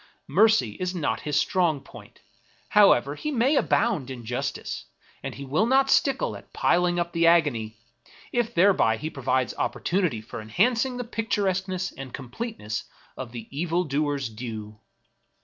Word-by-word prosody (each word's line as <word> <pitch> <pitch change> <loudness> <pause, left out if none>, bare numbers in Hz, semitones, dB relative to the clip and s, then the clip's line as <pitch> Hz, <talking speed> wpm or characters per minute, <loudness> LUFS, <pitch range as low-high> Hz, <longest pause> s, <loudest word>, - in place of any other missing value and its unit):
Mercy 210 - +4
is 185 0 -2
not 165 -4 -1
his 150 -1 -1
strong 175 -6 +1
point, 135 - -15 0.5
however 145 -10 +5
he 225 - -4
may 270 +1 +2
abound 205 - +1
in 125 -3 -7
justice; 125 +4 -4 0.4
and - - -6
he 140 - -7
will 150 +12 +1
not 270 +2 +3
stickle 270 -2 +2
at - - -13
piling 175 0 +2
up 170 0 -1
the 170 -1 +3
agony, 130 -10 +2 0.5
if 240 -2 0
thereby 175 - +4
he 155 +7 -5
provides 130 -2 0
opportunity 175 - 0
for 110 0 -8
enhancing 235 - +1
the 245 - -3
pictur 225 -3 -2
esqueness 185 -1 -1
and 135 -2 -7
completeness 130 - -5 0.3
of 130 -3 -7
the 115 -2 -8
evil 170 +3 0
doer's 145 -3 -1
due. 110 -2 -7
165 Hz, 150 wpm, -26 LUFS, 130-200 Hz, 0.5 s, however